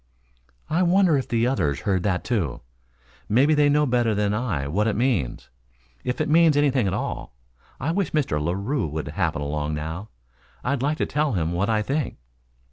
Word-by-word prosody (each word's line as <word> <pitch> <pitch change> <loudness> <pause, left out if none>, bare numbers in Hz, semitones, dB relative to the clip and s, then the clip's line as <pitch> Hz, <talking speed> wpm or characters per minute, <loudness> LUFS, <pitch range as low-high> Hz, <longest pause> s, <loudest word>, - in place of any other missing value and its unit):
"I 165 +4 +1
wonder 180 -2 +4
if 135 - -1
the 115 0 +1
others 85 - 0
heard 95 -4 0
that, 95 -1 0
too? 100 - -1 0.7
Maybe 135 +8 +4
they 145 -1 +4
know 150 +1 +3
better 120 -4 +1
than 105 0 +1
I 100 - -1
what 100 +9 0
it 110 - 0
means, 115 - -1 0.5
if 125 - -2
it 155 - 0
means 160 -1 +5
anything 135 -6 +2
at 95 - -1
all. - - -4 0.4
I 145 +5 -1
wish 190 -2 -1
Mr. 135 - 0
Larue 100 - -1
would 75 +1 -4
happen 75 - -1
along 75 +1 -2
now. 80 +7 -5 0.5
I'd 135 0 -1
like 150 +3 0
to - - 0
tell 150 -3 0
him 85 -4 0
what 95 +5 0
I 110 -1 +2
think." 140 +3 -2
115 Hz, 185 wpm, -24 LUFS, 85-145 Hz, 0.7 s, means